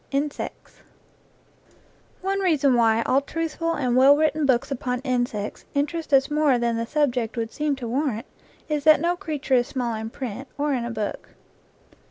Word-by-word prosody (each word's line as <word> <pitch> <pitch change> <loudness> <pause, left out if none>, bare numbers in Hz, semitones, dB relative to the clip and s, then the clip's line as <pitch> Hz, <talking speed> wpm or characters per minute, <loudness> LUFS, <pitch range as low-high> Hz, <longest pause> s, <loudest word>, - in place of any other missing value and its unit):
INSECTS 285 +1 -4 1.4
One 390 +1 0
reason 300 -8 +3
why 230 -1 +3
all 265 +4 +2
truthful 330 +2 -2
and 250 -3 0
well 270 +3 +7
written 310 -1 +1
books 265 +2 +1
upon 250 -1 -2
insects 245 -6 -2
interest 300 +3 -2
us 270 +1 +4
more 295 -4 +3
than 235 -1 0
the 230 0 -2
sub 295 -1 +2
ject 240 -1 -3
would 225 -1 -3
seem 300 -1 0
to 250 -3 -6
warrant 245 -2 -1 0.4
is 300 -2 -1
that 310 0 +7
no 340 +3 +1
creature 310 -7 -3
is 245 -1 +4
small 245 -3 -2
in 220 0 -4
print, 255 +1 -6
or 290 0 0
in 245 -3 -1
a - - -4
book. 215 -3 -5
270 Hz, 175 wpm, -24 LUFS, 240-300 Hz, 1.4 s, well